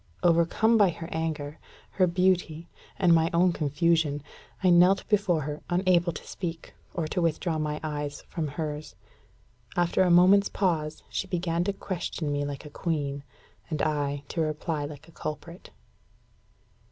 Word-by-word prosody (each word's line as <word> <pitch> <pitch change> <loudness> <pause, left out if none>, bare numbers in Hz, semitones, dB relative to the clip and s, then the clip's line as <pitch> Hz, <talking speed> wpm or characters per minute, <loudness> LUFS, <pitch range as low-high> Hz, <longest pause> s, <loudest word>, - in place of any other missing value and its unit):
Overcome 175 +7 +4
by 200 -3 +6
her 165 -1 -6
anger, 155 -2 -3 0.3
her 185 -2 +3
beauty, 175 -2 +1 0.3
and 180 -3 +5
my 165 0 +4
own 175 +1 +4
confusion, 150 -1 +1 0.4
I 185 - +5
knelt 180 +3 +5
before 200 -6 +2
her, 150 +1 -5
unable 175 -1 +3
to - - -9
speak, 165 -3 -6 0.2
or 165 -3 -1
to 180 - -1
withdraw 165 0 0
my 150 0 -2
eyes 145 -1 -4
from 160 -3 -3
hers. 150 +1 -5 0.8
After 175 +1 +2
a 185 - +4
moment's 185 +3 +6
pause, 160 -5 -1
she 195 - -3
began 170 -2 -1
to 200 - 0
question 175 -5 -4
me 145 0 0
like 145 +1 -6
a 150 - -10
queen, 145 -4 -2 0.5
and 155 -3 -2
I 145 -2 -1
to 165 - -2
reply 155 -1 -2
like 145 +1 -10
a - - -16
culprit. 170 +4 -7
165 Hz, 155 wpm, -27 LUFS, 150-180 Hz, 0.8 s, by